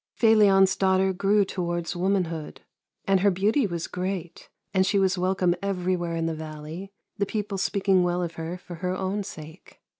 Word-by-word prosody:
Felion's 200 Hz, -4 st, +5 dB
daughter 190 Hz, 0 st, +2 dB
grew 200 Hz, +2 st, +2 dB
towards 175 Hz, -2 st, -3 dB
womanhood, 175 Hz, -4 st, -1 dB, 0.4 s
and 195 Hz, -1 st, +3 dB
her 200 Hz, +2 st, +4 dB
beauty 205 Hz, +7 st, +2 dB
was 170 Hz, -3 st, -4 dB
great, 180 Hz, -2 st, -5 dB, 0.2 s
and 190 Hz, -1 st, +4 dB
she 200 Hz, -, +1 dB
was 190 Hz, -1 st, +3 dB
welcome 185 Hz, -1 st, +1 dB
everywhere 180 Hz, -3 st, -1 dB
in 165 Hz, 0 st, -1 dB
the 165 Hz, -, -1 dB
valley, 155 Hz, +4 st, -7 dB, 0.3 s
the 200 Hz, -, +2 dB
people 205 Hz, -2 st, -3 dB
speaking 195 Hz, -1 st, +2 dB
well 180 Hz, 0 st, 0 dB
of 170 Hz, -1 st, -4 dB
her 165 Hz, +2 st, -5 dB
for 175 Hz, -1 st, -10 dB
her 180 Hz, +1 st, -2 dB
own 195 Hz, +2 st, -2 dB
sake. 160 Hz, -1 st, -11 dB
185 Hz, 170 wpm, -26 LUFS, 175-195 Hz, 0.4 s, Felion's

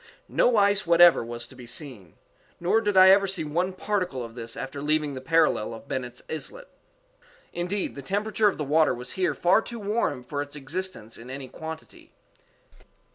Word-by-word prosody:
No 245 Hz, -2 st, +3 dB
ice 200 Hz, -1 st, +3 dB
whatever 170 Hz, -2 st, +7 dB
was 120 Hz, 0 st, -6 dB
to 125 Hz, -, -14 dB
be 125 Hz, -2 st, -11 dB
seen; 115 Hz, -, -8 dB, 0.4 s
_nor 200 Hz, +6 st, +2 dB
did 205 Hz, -2 st, +1 dB
I 185 Hz, 0 st, +9 dB
ever 195 Hz, 0 st, +5 dB
see 185 Hz, -4 st, -1 dB
one 170 Hz, +5 st, -1 dB
particle 185 Hz, -8 st, -2 dB
of 115 Hz, -, -11 dB
this 115 Hz, -1 st, -7 dB
after 135 Hz, +1 st, -6 dB
leaving 150 Hz, 0 st, 0 dB
the 130 Hz, -, -6 dB
parallel 155 Hz, -7 st, +2 dB
of 115 Hz, -, -13 dB
Bennet's 125 Hz, -2 st, -5 dB
Islet._Indeed, -, -, -7 dB
the 140 Hz, -, -8 dB
temperature 210 Hz, +6 st, +1 dB
of 200 Hz, -, 0 dB
the 150 Hz, -, -2 dB
water 150 Hz, -1 st, +3 dB
was 125 Hz, +1 st, -5 dB
here 185 Hz, -1 st, 0 dB
far 180 Hz, +5 st, +4 dB
too 235 Hz, +1 st, -8 dB
warm 210 Hz, -, -1 dB
for 145 Hz, +3 st, -4 dB
its 145 Hz, 0 st, -7 dB
existence 145 Hz, -, -5 dB
in 120 Hz, +2 st, -11 dB
any 135 Hz, 0 st, -6 dB
quantity. 160 Hz, +4 st, -10 dB
160 Hz, 180 wpm, -26 LUFS, 130-195 Hz, 0.4 s, I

